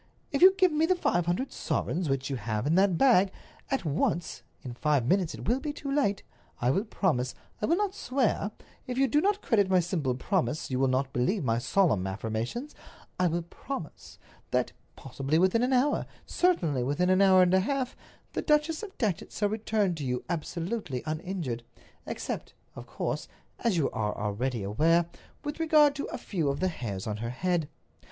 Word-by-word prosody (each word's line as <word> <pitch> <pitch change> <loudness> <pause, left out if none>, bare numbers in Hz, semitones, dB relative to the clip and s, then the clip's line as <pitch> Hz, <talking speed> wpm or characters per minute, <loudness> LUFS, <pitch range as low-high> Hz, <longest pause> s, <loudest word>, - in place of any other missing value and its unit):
If 280 - -1
you 380 +1 +9
give 370 -2 +4
me 310 +1 +2
the 370 - +3
five 175 - 0
hundred 185 +10 -1
sovereigns, 170 -1 -2
which 135 0 0
you 140 - -2
have 110 -1 -2
in 150 - +2
that 190 -1 +4
bag, 200 -7 +5 0.4
at 270 -8 -1
once—in 155 -4 -2
five 145 0 +1
minutes 180 +3 +1
it - - -8
will 245 +4 +2
be 295 +1 -3
too 285 -1 -6
late—I 200 - -1
will 195 +9 0
promise—I 165 - -2
will 335 - +4
not 410 -1 0
swear; 255 - 0 0.4
if 250 0 -3
you 270 0 +4
do 295 +5 +3
not 405 +3 +1
credit 205 -6 +2
my 185 -1 +5
simple 165 -7 -1
promise, 155 0 -1
you 130 - 0
will 135 - +3
not 130 +1 0
believe 155 - +1
my 115 -2 +1
solemn 130 - +2
affirmation—I 115 - -4
will 170 +1 -1
promise 170 - -8 0.3
that, - - 0 0.2
possibly 135 +3 -2
within 190 +6 +3
an 250 +2 +1
hour, 265 +3 +2 0.2
certainly 170 - +1
within 145 +9 +1
an 185 +1 +4
hour 190 -1 +7
and 180 0 +2
a 190 - +6
half, 260 +5 -1 0.4
the - - -1
Duchess 300 +2 +2
of 405 -3 -9
Datchet 205 -9 -1
shall 205 -1 0
return 215 -3 0
to 155 -3 -5
you 125 -2 -2
absolutely 170 - -3
uninjured—except, 155 -8 -5 0.2
of - - -9
course, - - -3 0.3
as 225 -6 +1
you 155 - +1
are 105 -1 -2
already 110 +2 -2
aware, 160 - +3 0.4
with 295 +1 -5
regard 305 -3 +5
to 280 - -4
a - - -5
few 175 - -2
of 140 - -2
the 185 - +1
hairs 105 - -5
of 105 -1 -3
her 115 +1 -3
head. 170 +4 -1
180 Hz, 180 wpm, -28 LUFS, -, 0.4 s, you